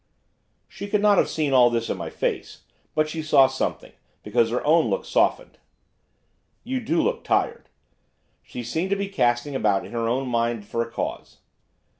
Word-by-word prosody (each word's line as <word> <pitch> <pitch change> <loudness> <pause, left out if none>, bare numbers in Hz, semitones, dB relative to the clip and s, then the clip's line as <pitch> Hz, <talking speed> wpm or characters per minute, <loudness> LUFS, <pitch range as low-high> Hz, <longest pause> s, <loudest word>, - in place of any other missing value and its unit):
She 200 - -8
could 205 0 0
not 205 -2 +5
have - - +2
seen 150 -3 -1
all 125 -2 +6
this 115 -1 -1
in - - -2
my 85 -3 -6
face; - - -4 0.3
but 155 0 +2
she 160 +1 -4
saw 150 -3 +5
something 130 0 -3 0.3
because 115 +2 +1
her 120 +2 -2
own 160 +2 +4
look - - -2
softened. - - 0 1.0
'You 260 +1 -2
do 170 -8 0
look - - -1
tired.' - - -1 0.7
She 125 - -8
seemed 160 +11 -2
to 200 - +2
be 200 0 -3
casting 120 -6 0
about 105 -6 +1
in - - -11
her 115 -1 -1
own 130 +3 -1
mind 115 -3 -1
for 115 - -2
a 115 - -3
cause. 115 - -5
130 Hz, 180 wpm, -24 LUFS, 115-165 Hz, 1.0 s, all